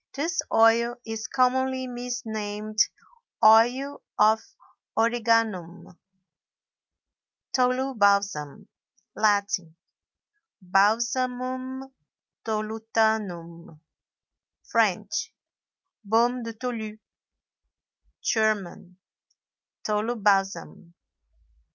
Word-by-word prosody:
This 325 +4 -1
oil 230 +1 +4
is 225 -1 -5
commonly 260 0 +1
misnamed 220 -4 -5 0.7
Oil 245 +6 +4 0.2
of 220 +1 +4 0.6
Origanum. 225 -7 0 1.6
TOLU 255 +1 +1
BALSAM. 200 - +1 0.5
Latin—Balsamum 235 - -2 0.5
tolutanum; 215 -7 -2 0.8
French—Beaume 235 +3 -2
de 230 - -5
Tolu; 225 -2 -5 1.3
German—Tolubalsam. 205 -1 -2
220 Hz, 45 wpm, -26 LUFS, 205-250 Hz, 1.6 s, oil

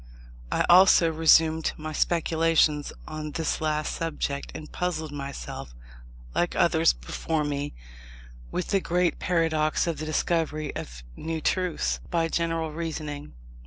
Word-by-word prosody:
I - - +2
also 175 -2 +7
resumed 160 0 +4
my 155 0 -6
speculations 160 -2 +2 0.2
on 155 -1 -5
this 160 -1 -1
last 155 -1 0
subject, 150 -4 -3
and 155 - -8
puzzled 160 -4 -2
myself, 140 - -7 0.6
like - - 0
others - - +4
before 150 - -3
me, 145 0 -3 0.8
with 180 - -3
the 195 - +2
great 175 0 +1
paradox 160 -3 +1
of 170 -2 -2
the 155 - -4
discovery 155 -1 -1
of - - -7
new 160 0 -3
truths 155 - 0
by 165 -1 +1
general 165 -1 -1
reasoning. 150 -2 -5
160 Hz, 125 wpm, -26 LUFS, 150-165 Hz, 0.8 s, also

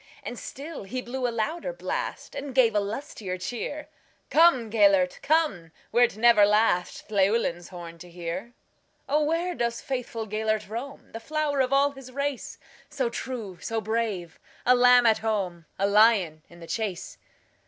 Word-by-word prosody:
And 245 - -6
still 300 +4 -7
he 255 +6 -4
blew 250 +1 -3
a - - 0
louder 275 - -2
blast, - - -4
And 280 -2 -6
gave 240 -4 +5
a 210 - +3
lustier 205 -3 -5
cheer:"Come, 290 - 0
Gêlert, 200 -4 +3
come, 280 - +1 0.2
wert 240 -3 +3
never 235 -1 +6
lastLlewelyn's 205 -2 +1
horn 170 -2 -9
to 180 +1 -11
hear."O, 190 - -5
where 335 +4 0
doth 235 -5 -2
faithful 240 -4 -4
Gêlert 215 0 -1
roam, 245 +7 -7
The 225 - -6
flower 300 +3 -1
of 260 -1 +2
all 280 +1 +4
his 270 -2 -12
race, 280 0 -3 0.3
So 265 -5 -1
true, 230 -8 -6
so 225 0 -2
brave,—a 220 0 -1
lamb 250 0 +6
at 220 -1 +4
home,A 195 -4 -2
lion 200 -6 +4
in 170 - -15
the - - -8
chase?" 200 -1 -4
230 Hz, 145 wpm, -26 LUFS, 200-265 Hz, 0.3 s, never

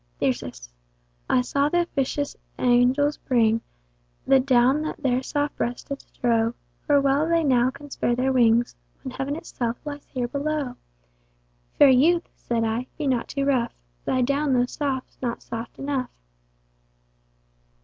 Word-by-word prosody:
Thyrsis. - - -2 0.6
I 255 - +4
saw 280 +3 +1
th'officious 290 -4 -1 0.2
angels 255 +4 +3
bring, 230 -3 +2 0.6
The 270 - +5
down 260 +2 +3
that 310 -1 -5
their 255 -1 +2
soft 290 +2 -2
breasts 240 +1 -2
did 280 -1 -6
strow, 230 -1 0 0.3
For 290 -1 +5
well 280 +3 +2
they 335 -1 +3
now 255 -3 +3
can 280 +2 -11
spare 240 - 0
their 260 +2 +1
wings, 235 -1 +3 0.3
When 260 - -5
Heaven 275 +3 -3
itself 245 -8 -4
lies 290 -1 -6
here 250 -2 -3
below. 285 0 -2 1.0
Fair 285 - +8
youth 325 +7 +4
(said 230 -1 -2
I) 225 +3 -1
be 300 - -3
not 255 -4 0
too 275 0 -2
rough, 255 -4 +1 0.3
Thy 255 -1 +1
down 280 +2 +1
though 245 -1 +3
soft's 265 0 -4
not 240 -2 -3
soft 230 0 -7
enough. 275 -2 -2
265 Hz, 145 wpm, -24 LUFS, 245-285 Hz, 1.0 s, Fair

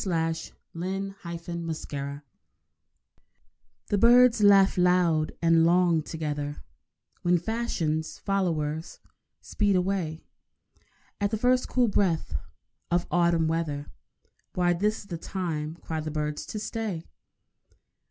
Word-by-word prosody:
THE 195 - -3
END 175 +4 -4
OF 170 -1 -6
THE 170 -2 -3
SUMMER 140 -1 -6 1.7
The 205 - +2
birds 240 0 +6
laugh 200 -1 +6
loud 180 -4 +3
and 165 0 +5
long 170 -1 +4
together 150 -2 -4 0.6
When 175 0 +3
Fashion's 170 -6 -2
followers 165 -5 -2 0.4
speed 205 -2 0
away 180 -4 -1 1.0
At 200 0 +1
the 220 - -1
first 250 +3 +2
cool 250 -2 +3
breath 190 -6 0 0.6
of 175 0 +1
autumn 170 -2 +3
weather. 155 -3 -2 0.6
Why, 175 -1 +3
this 210 +5 0
is - - -14
the 175 -5 -6
time, 165 -5 -3
cry 160 -2 -5
the 155 0 -4
birds, 150 -1 -3
to - - -5
stay! 210 -5 -3
170 Hz, 115 wpm, -27 LUFS, 160-195 Hz, 1.7 s, birds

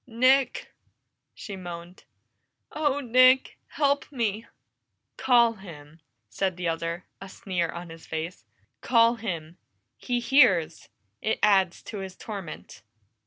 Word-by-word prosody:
"Nick!" 255 +2 +2 0.6
she 200 - -8
moaned. 175 -1 -9 0.7
"Oh, 290 -2 0
Nick! 255 +1 +4
Help 285 -1 0
me!" 225 -4 -2 0.7
"Call 240 -3 +4
him!" 160 -6 -13 0.3
said 185 - -2
the 180 -1 -3
other, 165 +1 -3 0.2
a 195 - -9
sneer 185 -5 -3
on 170 0 -8
his 165 0 -13
face. 160 -3 -5 0.4
"Call 230 -1 +4
him! 170 -6 -6 0.4
He 245 - -2
hears; 230 - +3 0.3
it 220 - 0
adds 190 -4 +3
to 210 - -7
his 190 -1 -7
torment!" 190 - -8
195 Hz, 120 wpm, -26 LUFS, 170-240 Hz, 0.7 s, Nick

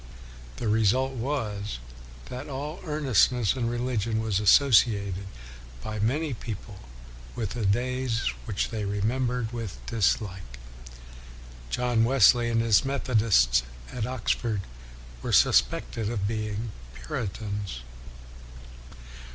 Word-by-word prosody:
The 115 - -3
result 110 +5 +2
was 115 - -3 0.5
that 125 +3 -7
all 145 +4 -5
earnestness 130 - +2
in 120 -3 -1
religion 120 -2 -1
was 110 -3 0
associated 105 -4 +4 0.6
by 110 -1 -4
many 140 +7 0
people 105 -3 -7 0.6
with 110 -4 -3
the 115 -5 -1
days 125 +2 0
which 105 -5 -1
they 110 -2 -3
remembered 115 +4 -1
with 115 -6 -5
dislike. 95 - -1 1.1
John 120 - +1
Wesley 120 -1 +5
and 115 0 +2
his 110 -5 +4
Methodists 110 - +3 0.3
at 110 -3 -2
Ox 130 -3 -1
ford 110 -5 -1 0.6
were - - -3
suspected 70 - +3
of 100 -4 -1
being 110 0 -3 0.2
Puritans. 100 - -4
115 Hz, 105 wpm, -27 LUFS, 100-125 Hz, 1.1 s, Wesley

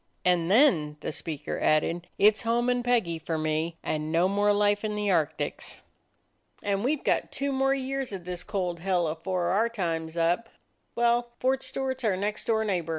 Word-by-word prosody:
And 175 -2 +2
then," 185 - +4
the - - -3
speaker 150 -1 -5
added, 165 +3 +1
"it 210 +1 +6
's - - -3
home 240 +2 +1
and 245 0 0
Peggy 225 -10 +1
for 160 0 -3
me, 155 +1 -1
and 155 0 -2
no 170 +3 +3
more 205 +1 +2
life 205 0 +2
in 210 -1 -2
the 210 -1 -1
Arctics." 155 -3 -2 0.8
"And 200 0 0
we 275 +5 +2
've 290 - -14
got - - 0
two 280 0 -2
more 270 0 +2
years 270 -1 -3
of 190 -3 -6
this 180 -1 -5
cold 180 -4 -2
hell 180 -1 +1
afore 175 +3 -2
our 215 +6 +2
time 165 -7 -2
's 165 - -12
up. 175 +7 +1 0.5
Well, 240 0 +2
Fort 265 +1 +1
Stewart 260 0 -3
's - - -8
our 205 -5 +1
next 210 +2 -3
door 220 -1 +1
neighbor. 180 -5 -1
195 Hz, 200 wpm, -27 LUFS, 165-235 Hz, 0.8 s, it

